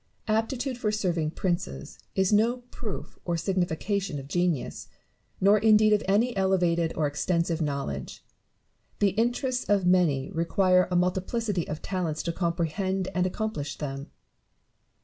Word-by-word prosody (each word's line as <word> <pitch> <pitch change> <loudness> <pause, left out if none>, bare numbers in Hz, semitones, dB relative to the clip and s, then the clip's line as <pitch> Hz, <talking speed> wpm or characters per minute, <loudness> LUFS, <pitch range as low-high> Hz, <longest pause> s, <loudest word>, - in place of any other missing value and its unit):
Aptitude 240 +4 -1
for 210 -3 0
serving 175 -7 0
princes 170 - -3 0.2
is 190 +2 +2
no 235 +4 +2
proof 215 -4 -7
or 175 - -1
signifi 175 -2 -1
cation 200 -6 -1
of 135 -1 -7
genius, 175 -3 -1 0.5
nor 200 +2 +5
indeed 215 0 +5
of 210 - +3
any 220 +5 +2
elevated 175 -4 +2
or 155 - +2
extensive 165 +3 0
knowledge. 140 - -4 0.7
The 205 - +3
interests 245 +4 0
of 200 -3 +3
many 170 -7 +2
require 180 +2 +3
a 180 - -1
multiplicity 185 +2 0
of 150 - -5
talents 175 -5 -2
to 170 - -1
comprehend 180 +2 -1
and 180 0 +1
accomplish 180 -8 -3
them. 140 -1 -5
185 Hz, 135 wpm, -27 LUFS, 165-210 Hz, 0.7 s, nor